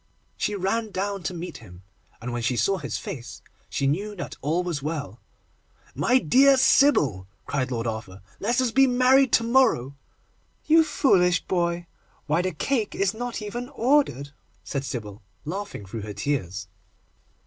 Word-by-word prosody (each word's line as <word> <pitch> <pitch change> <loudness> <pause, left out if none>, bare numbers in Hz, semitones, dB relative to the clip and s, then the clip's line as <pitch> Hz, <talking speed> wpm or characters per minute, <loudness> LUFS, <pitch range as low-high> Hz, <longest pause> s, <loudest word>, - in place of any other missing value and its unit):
She 210 - -1
ran 215 +4 -1
down 200 0 -3
to 180 - -3
meet 175 +1 -6
him, 90 -4 -14 0.4
and, 120 +2 -5
when 120 - -2
she 125 +1 0
saw 195 +9 +1
his - - -4
face, 125 -2 -8 0.3
she 140 - -1
knew 200 +10 -1
that 175 - -6
all 160 +6 0
was 170 -6 -3
well. 150 -1 -4 0.7
'My 250 - +3
dear 265 - +5
Sybil,' 150 - +4 0.2
cried 135 -2 -1
Lord 115 -2 -3
Arthur, 110 -4 -5 0.2
'let 240 +5 0
us 255 -3 +1
be 270 +2 +5
married 255 +1 +4
to - - +5
morrow!' 230 - +2 0.7
'You 320 +1 +6
foolish 180 - +3
boy! 170 -1 -1 0.4
Why, 155 +3 +1
the 185 +1 -1
cake 235 -3 -1
is 195 0 +1
not 235 -1 -5
even 240 +4 -5
ordered!' 255 - +1 0.3
said 140 -1 -3
Sybil, 105 -6 -6 0.2
laughing 190 - -5
through 105 +4 -6
her 105 0 -6
tears. 100 -5 -3
180 Hz, 160 wpm, -25 LUFS, -, 0.7 s, You